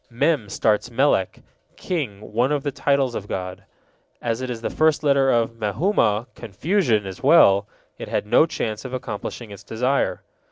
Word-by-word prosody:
Mem 130 -2 0
starts 105 +3 +1
Melek, 120 -6 +1 0.3
king, 110 - -4
one 125 +5 +2
of 145 -2 0
the 145 - -2
titles 140 -2 +1
of 105 -3 -5
God. 90 -1 -5 0.5
As 115 +1 -2
it 130 - -4
is 115 -2 -5
the - - -3
first 155 -1 +2
letter 140 -2 +3
of 115 -1 0
Mehumah, 110 - +1
confusion, 120 - 0
as 95 -1 -8
well, 100 +1 +5 0.3
it - - -6
had - - -1
no 120 +9 +4
chance 110 -9 -4
of 130 -1 -8
accomplishing 120 -2 -6
its 100 - -11
desire. 125 +5 -1
120 Hz, 165 wpm, -22 LUFS, 105-140 Hz, 0.5 s, well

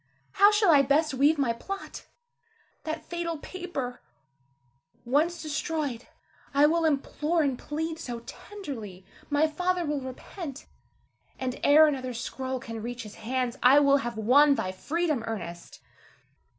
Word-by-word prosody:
how 405 +1 +6
shall 415 -4 +4
I 290 -3 +7
best 285 +3 +2
weave 285 +4 +3
my 265 -5 +1
plot? 390 +12 -7 0.8
That 315 0 -4
fatal 340 -1 -3
paper, 295 -8 -6 1.0
once 315 +7 +1
destroyed, 305 -5 -3 0.5
I 285 +1 +6
will 330 +2 +2
implore 305 +2 +1
and 275 -3 0
plead 320 +5 -4
so 240 -2 -6
tenderly, 235 - -9 0.2
my 295 +1 +3
father 360 +3 -1
will 295 -2 -2
repent; 275 +3 -8 0.7
and 255 -1 -4
ere 300 +2 +7
another 260 -4 -2
scroll 260 +2 -4
can 230 -2 -7
reach 245 +2 -5
his 210 -1 -10
hands, 250 +2 -2
I 255 +3 +7
will 280 -1 +5
have 240 -4 -4
won 275 +6 +5
thy 185 - -2
freedom, 305 - -1
Ernest! 175 -6 -6
285 Hz, 135 wpm, -27 LUFS, 245-320 Hz, 1.0 s, I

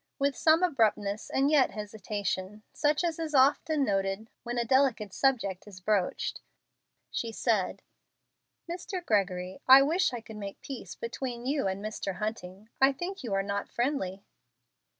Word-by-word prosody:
With 280 -1 +1
some 320 +2 +4
abruptness 215 - +1
and 275 +2 +2
yet 285 -4 +5
hesitation, 210 -1 -4
such 295 +3 +1
as 335 -2 -1
is 315 -2 -2
often 285 +2 +4
noted 195 +1 -1
when 240 0 -4
a 235 - +1
delicate 240 -6 +2
subject 225 -9 0
is 195 -3 -11
broached, 195 -1 0 0.7
she 230 - -2
said, 220 -4 0 0.8
"Mr. 355 +1 -5
Gregory, 190 - 0
I 265 +1 +10
wish 340 +5 +2
I 245 - -4
could 220 -1 -11
make 200 -1 -7
peace 270 -4 -7
between 240 0 -5
you 275 -4 0
and 190 +2 -3
Mr. 205 -3 -3
Hunting. 210 -1 -5
I 270 +1 +6
think 360 +6 -5
you 215 -5 -1
are 195 - +1
not 200 0 -3
friendly." 235 -7 -2
230 Hz, 150 wpm, -29 LUFS, 200-275 Hz, 0.8 s, I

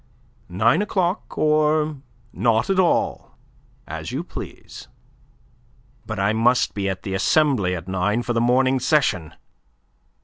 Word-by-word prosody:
Nine 115 - +2
o'clock 190 -2 -2
or 155 0 +2 0.4
not 115 - +1
at 190 - +1
all, 180 -2 0 0.5
as - - -6
you - - -3
please." - - -10 1.2
"But 110 -2 -4
I 100 +2 +1
must 120 +3 +2
be 100 -1 -2
at 95 - -5
the 95 - -4
Assembly 100 - +2
at 85 0 -8
nine, 100 +5 0
for 120 - -2
the 115 - +1
morning 130 +2 +2
session." 110 - 0
120 Hz, 130 wpm, -22 LUFS, 100-150 Hz, 1.2 s, Nine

